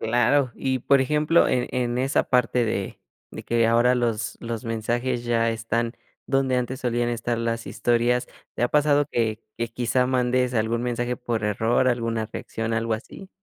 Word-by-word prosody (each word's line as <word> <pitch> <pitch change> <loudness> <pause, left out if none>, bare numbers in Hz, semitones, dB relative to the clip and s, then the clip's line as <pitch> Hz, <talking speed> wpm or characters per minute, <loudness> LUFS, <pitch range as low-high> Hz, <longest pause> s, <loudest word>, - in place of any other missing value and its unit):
Claro, 120 +3 +2
y 130 -1 -1
por 140 +1 +4
ejemplo, 150 +4 +3
en 125 -1 0
en 125 -1 -1
esa 135 +2 +1
parte 125 -1 +2
de 100 -3 -3 0.3
de - - -9
que 115 -1 +2
ahora 120 +2 +4
los 115 -2 -1
los 115 0 -5
mensajes 120 +2 -2
ya 115 -1 +1
están 115 +1 -2 0.3
donde 135 -2 +1
antes 125 +2 -2
solían 120 -1 0
estar 120 0 -2
las 115 0 -2
historias, 120 +1 +1 0.3
¿te - - -3
ha 120 - +3
pasado 145 -1 +3
que 110 -2 -1 0.2
que 115 -1 -1
quizá 125 +2 0
mandes 125 0 +1
algún 115 +1 0
mensaje 120 0 -2
por 115 -4 -3
error, 110 +5 +2
alguna 115 -2 -1
reacción, 115 0 -4
algo 115 0 0
así? 155 - -10
120 Hz, 170 wpm, -24 LUFS, 115-125 Hz, 0.3 s, por